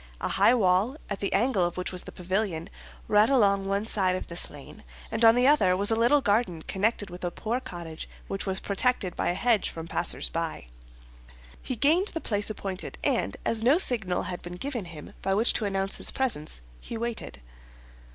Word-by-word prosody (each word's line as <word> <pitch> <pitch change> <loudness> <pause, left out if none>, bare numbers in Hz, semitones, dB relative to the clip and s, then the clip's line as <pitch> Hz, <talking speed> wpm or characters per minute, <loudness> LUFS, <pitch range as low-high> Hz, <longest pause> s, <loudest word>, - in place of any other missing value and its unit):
A - - -2
high 245 - +4
wall, 205 +5 +2
at 200 - -2
the 200 - -2
angle 225 -4 +2
of 175 0 -1
which 180 - -2
was 180 -1 -3
the - - -8
pavilion, 185 -2 -2 0.4
ran 210 +2 +4
along 200 -7 +3
one 200 +2 0
side 190 -4 +2
of 185 - -4
this 170 +1 +1
lane, 145 -2 -12 0.3
and 230 - 0
on 225 0 +8
the 245 +1 +3
other 265 -11 +4
was 200 +3 +1
a - - +3
little 240 +6 +4
garden 200 -7 0
connected 205 -1 -1
with 180 +1 -9
a 175 - 0
poor 225 +7 -3
cottage 170 -8 -8 0.2
which 195 +1 -4
was 190 0 0
protected 200 -2 0
by - - 0
a 175 - 0
hedge 230 +1 +2
from 165 0 -8
passers - - 0
by. - - -4 1.0
He 255 - -4
gained 320 - +3
the 330 - +1
place 205 -7 -1
appointed, 195 -3 -5
and - - 0
as 225 -1 +2
no 260 +7 +4
signal 220 - 0
had 180 - -5
been 175 0 -8
given 245 0 -4
him 165 -3 -10
by 195 - 0
which 225 +4 +3
to 220 - 0
announce 195 -1 +1
his - - +3
presence, 155 - -2 0.2
he 230 - -7
waited. 230 - -4
200 Hz, 200 wpm, -27 LUFS, 180-235 Hz, 1.0 s, on